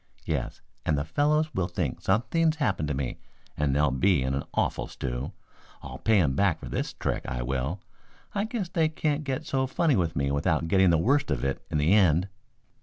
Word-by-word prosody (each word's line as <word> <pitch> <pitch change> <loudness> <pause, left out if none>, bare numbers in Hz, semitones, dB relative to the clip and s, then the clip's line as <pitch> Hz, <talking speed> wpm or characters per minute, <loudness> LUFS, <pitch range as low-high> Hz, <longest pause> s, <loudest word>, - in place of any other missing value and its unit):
Yes, - - -3 0.2
and 75 - +1
the 70 - -1
fellows 150 - +1
will 90 -2 0
think 85 -7 -3
something's 155 - +2
happened 100 - 0
to 75 - -1
me 65 -2 -3 0.4
and 70 -2 0
they'll 75 -1 +3
be 75 +2 +2
in 65 +1 -1
an 70 - -1
awful - - 0
stew. 65 +5 -4 0.5
I'll - - -8
pay 110 -2 +3
'em 75 -7 +2
back 95 -2 +2
for - - -8
this - - -2
trick, - - -2
I 60 -1 -3
will. 65 +9 -2 0.5
I 205 0 0
guess 220 -4 -3
they 165 -3 +1
can't 155 -1 -1
get 140 +2 -3
so 130 -2 0
funny 150 +1 +2
with 85 -5 0
me 70 0 0
without 80 +3 +1
getting 95 +1 +4
the 85 - +4
worst 135 - +2
of 70 -4 -1
it 70 - -1
in - - 0
the 75 +6 +3
end." 95 -2 +4
90 Hz, 205 wpm, -27 LUFS, -, 0.5 s, getting